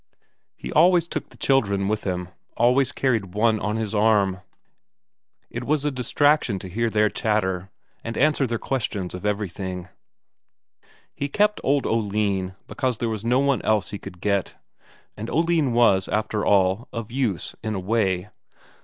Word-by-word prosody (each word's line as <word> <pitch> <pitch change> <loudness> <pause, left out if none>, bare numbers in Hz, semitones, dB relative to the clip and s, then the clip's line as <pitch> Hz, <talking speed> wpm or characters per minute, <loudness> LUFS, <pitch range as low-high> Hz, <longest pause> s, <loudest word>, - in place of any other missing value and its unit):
He - - -7
always 170 +1 +5
took - - -5
the - - -18
children 100 -8 +1
with 105 +1 -1
him, 90 -2 -2 0.3
always 125 +3 +3
carried 110 -8 -1
one 110 0 +3
on 105 +1 -2
his 110 -2 -2
arm. 105 -3 +2 1.1
It - - -4
was 150 0 0
a 150 - +1
distraction 130 -2 +2
to 95 - -8
hear 115 +5 0
their 105 -1 +3
chatter, 95 -4 -1 0.3
and 115 - -5
answer 145 -2 +3
their 115 0 -1
questions 105 -8 -3
of 90 +3 -4
everything. 95 -3 -3 1.2
He 140 - -3
kept 210 +6 +2
old 140 0 +2
Oline 100 -4 0
because 130 -3 -2
there 115 - -1
was 110 -2 -3
no 120 +2 +2
one 140 -1 +2
else 110 -2 +1
he 100 - -5
could 90 0 -11
get. 100 -2 0 0.6
And 110 +3 -6
Oline 165 -4 +2
was, 115 -6 +4
after 105 0 -1
all, 95 +3 +2
of 115 -1 -6
use 120 - -1
in 110 -1 -3
a - - -2
way. 95 -1 0
110 Hz, 160 wpm, -24 LUFS, 100-130 Hz, 1.2 s, always